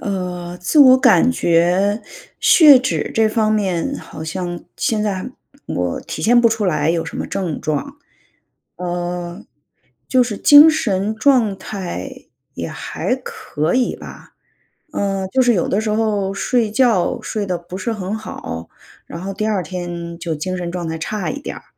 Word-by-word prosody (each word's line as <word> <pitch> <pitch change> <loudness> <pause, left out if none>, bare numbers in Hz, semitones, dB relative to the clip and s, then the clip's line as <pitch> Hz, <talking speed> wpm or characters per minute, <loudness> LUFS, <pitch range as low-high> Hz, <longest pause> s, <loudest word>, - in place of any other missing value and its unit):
呃， 180 -3 -4
自 180 - +1
我 260 -2 +8
感 255 -1 +5
觉 185 +1 +2 0.4
血 295 -6 +8
脂 260 - -2
这 220 -1 +3
方 215 -1 +1
面 190 -6 -1
好 - - -10
像 175 +1 -4
现 215 -2 0
在 205 +2 -3 0.4
我 90 -1 -2
体 - - -7
现 240 +2 +5
不 235 - +5
出 220 -1 -1
来 155 -4 +1
有 165 -1 -1
什 - - -7
么 - - -3
症 185 -6 -3
状。 155 - -3 0.8
呃， 175 +1 -4 0.6
就 255 -1 +4
是 230 -4 -3
精 290 +6 +8
神 215 -9 0
状 220 -4 +2
态 185 - -7 0.3
也 - - -5
还 - - -3
可 155 +3 -3
以 255 -1 +1
吧， - - -12 0.6
嗯， 195 -1 -1
就 260 +7 +2
是 245 -1 +4
有 180 - 0
的 205 +3 0
时 220 - -2
候 210 -3 0
睡 225 +2 0
觉 220 -5 +2
睡 210 -2 -3
得 180 -1 -1
不 175 +2 -9
是 215 +5 -3
很 200 -1 -4
好， 85 - -7 0.4
然 170 - -7
后 195 +1 -4
第 215 +2 -2
2 205 -4 0
天 175 -2 -6
就 165 -2 -3
精 185 +5 -3
神 175 -1 -4
状 175 -1 -4
态 160 0 -3
差 195 +3 -3
一 280 - -6
点 - - -6
儿。 - - -11
195 Hz, 180 characters per minute, -19 LUFS, 175-220 Hz, 0.8 s, 我